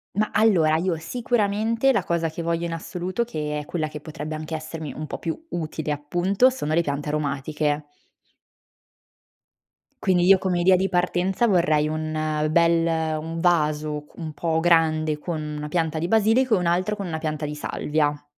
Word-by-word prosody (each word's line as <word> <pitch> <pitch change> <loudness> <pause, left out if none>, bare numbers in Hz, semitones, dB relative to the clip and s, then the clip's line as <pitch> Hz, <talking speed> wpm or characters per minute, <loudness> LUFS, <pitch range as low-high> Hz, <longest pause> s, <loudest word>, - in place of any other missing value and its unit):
Ma 215 +1 +1
allora, 185 -8 +4
io 170 0 0
sicuramente 225 +5 +1
la 195 - +1
cosa 170 -2 0
che 160 +2 -6
voglio 170 0 -1
in 165 - -3
assoluto, 180 +6 -3
che 150 -9 -3
è 150 - -7
quella 155 -2 -2
che 150 -1 -8
potrebbe 155 0 -6
anche 155 +1 -5
essermi 155 -1 -6
un 155 +1 -6
po' - - -5
più 165 - -4
utile, 155 -2 -3
appunto, 175 - +2
sono 250 - -3
le 170 - +4
piante 145 -2 -3
aromatiche. 150 0 -1 2.2
Quindi 180 -2 +3
io 190 0 +7
come 180 -2 0
idea 185 +1 +6
di 190 +1 +1
partenza 180 +4 +1
vorrei 165 -6 +3
un 155 0 -1
bel 165 -1 +2
un 165 +1 -5
vaso 155 -3 +1
q - - -24
un 160 -3 -6
po' 160 0 0
grande 160 -2 +2
con 165 0 -4 0.2
una 150 - -4
pianta 160 0 -1
di 170 - -1
basilico 225 +4 +3
e - - +2
un 180 - -1
altro 185 +5 +1
con 200 - -5
una 160 -3 -3
pianta 155 -1 -3
di 150 - -4
salvia. 150 0 -1
165 Hz, 175 wpm, -24 LUFS, 155-180 Hz, 2.2 s, io